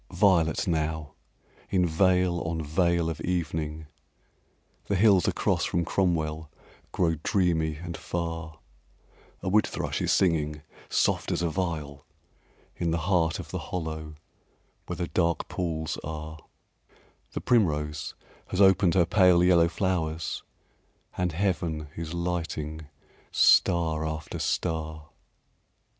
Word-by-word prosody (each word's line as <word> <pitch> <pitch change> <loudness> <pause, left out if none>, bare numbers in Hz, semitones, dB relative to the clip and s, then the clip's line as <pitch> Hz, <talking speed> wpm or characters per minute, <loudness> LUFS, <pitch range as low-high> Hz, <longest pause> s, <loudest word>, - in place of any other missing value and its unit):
Violet 85 -7 +3
now, 80 -2 -1 0.6
in 90 -2 +2
veil 90 +1 +2
on 80 0 -2
veil 85 +2 +1
of 80 -2 -4
evening 80 -3 -2 1.0
The 100 - 0
hills 95 -2 +5
across - - +1
from 85 -1 0
Cromwell 80 -5 0 0.4
grow 80 -3 +1
dreamy 80 -4 +1
and 85 +2 -7
far; 85 -2 -4 0.9
A - - -3
wood 105 +3 +4
thrush - - -3
is - - +1
singing 75 -5 +1 0.3
soft - - +1
as 85 - 0
a 85 - +1
viol 80 -6 -3 0.7
In 85 - -1
the 80 - +1
heart 85 -4 +2
of - - -8
the - - -3
hollow 80 -3 -4 0.7
where - - -4
the 90 - -1
dark 85 -2 0
pools 80 -3 -3
are; 80 +1 -6 0.9
The - - -3
primrose 75 -9 +1 0.3
has 95 - -3
opened 95 -3 +5
her 90 -2 +5
pale 90 -1 +5
yellow 85 -2 +5
flowers 85 -3 -2 0.7
And 90 -1 0
heaven 80 -4 -1
is 80 -1 -5
lighting 80 -3 -3 0.4
star 80 -2 +4
after 80 0 -4
star. 80 -2 -2
85 Hz, 120 wpm, -27 LUFS, 80-90 Hz, 1.0 s, hills